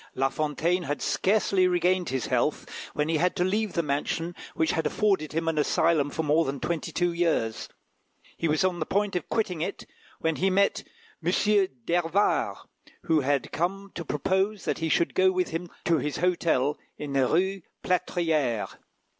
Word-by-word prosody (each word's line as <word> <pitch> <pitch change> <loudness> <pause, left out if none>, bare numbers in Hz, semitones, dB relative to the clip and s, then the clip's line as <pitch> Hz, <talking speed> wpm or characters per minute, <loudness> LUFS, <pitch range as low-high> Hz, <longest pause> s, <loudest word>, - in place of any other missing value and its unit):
La 135 +1 +2
Fontaine 155 +5 0
had 145 -3 -3
scarcely 195 -2 +2
regained 180 0 +1
his 130 -3 -2
health, - - 0 0.3
when 150 0 0
he 160 0 +1
had 180 +3 +1
to 180 - +1
leave 210 +3 0
the 170 - 0
mansion 155 +4 -2 0.2
which 160 0 +2
had 160 - 0
afforded 195 -8 +1
him 165 +1 -1
an 160 -2 +1
asylum 150 0 +2
for 160 - -3
more 155 +2 +3
than 135 -2 -3
twenty 170 -3 -3
two 175 0 0
years; 165 -10 0 0.7
he 165 - -1
was 155 +2 +2
on 185 -2 0
the 155 - -1
point 200 0 0
of 180 - -3
quitting 185 -8 -1
it - - -4 0.3
when 160 -1 -1
he 190 - +2
met 200 +1 +2 0.4
M. 170 - +1 0.5
d'Hervart, 175 +3 +1 0.5
who 160 -1 +3
had 140 -1 0
come 195 +4 -2
to 170 - -5
propose 190 +7 -1
that - - -1
he 165 0 -1
should 170 - +2
go 185 0 +4
with 185 -1 0
him 165 +2 -4 0.2
to 165 -2 +3
his 150 - -3
hotel 165 -5 +1 0.2
in 145 -2 -5
the 135 -2 +3
Rue 190 +5 +1 0.2
Plâtrière. 160 - 0
170 Hz, 180 wpm, -27 LUFS, 150-185 Hz, 0.7 s, go